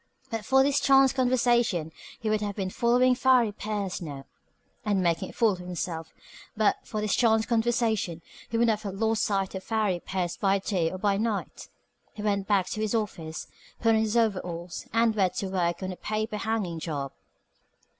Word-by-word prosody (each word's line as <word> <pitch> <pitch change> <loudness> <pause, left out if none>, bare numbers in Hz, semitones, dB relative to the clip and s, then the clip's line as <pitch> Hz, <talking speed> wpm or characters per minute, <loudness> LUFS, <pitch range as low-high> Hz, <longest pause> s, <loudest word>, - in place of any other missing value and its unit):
But 225 -2 -3
for 265 +4 +4
this 280 0 +2
chance 270 -1 +5
conversation 240 - +2 0.3
he 225 - -4
would 215 0 +1
have 205 -1 -3
been 190 -2 -3
following 250 +2 +3
Farry 250 -3 +4
Pierce 205 -3 -4
now, 140 -5 -7 0.6
and 205 -4 +1
making 170 -2 0
a - - -9
fool 225 -2 +3
of 185 - -5
himself. 175 -2 -5 0.5
But 215 -1 +3
for 215 - -4
this 210 -1 0
chance 220 -2 +3
conversation 225 -7 0 0.3
he 230 - -1
would 235 - +4
not 220 -2 +1
have 200 -3 -5
lost 220 +1 +1
sight 195 -3 0
of 190 -1 -5
Farry 215 -5 0
Pierce 180 -2 -2
by 195 -1 +2
day 190 -4 0
or 185 - -6
by 200 +1 +1
night. 215 -1 -3 0.4
He 210 - -7
went 200 -2 0
back 200 -3 +3
to 215 - -3
his 215 +1 0
office, 175 -7 -3 0.3
put 230 - +2
on 220 -1 +4
his 220 +1 0
overalls, 180 -6 -1
and 230 0 +3
went 190 -4 +1
to - - -2
his 190 - -5
work 175 0 0
on 185 - -3
a - - -6
paper 215 0 -2
hanging 210 -7 -2
job. 145 -4 -4
210 Hz, 195 wpm, -27 LUFS, 185-225 Hz, 0.6 s, chance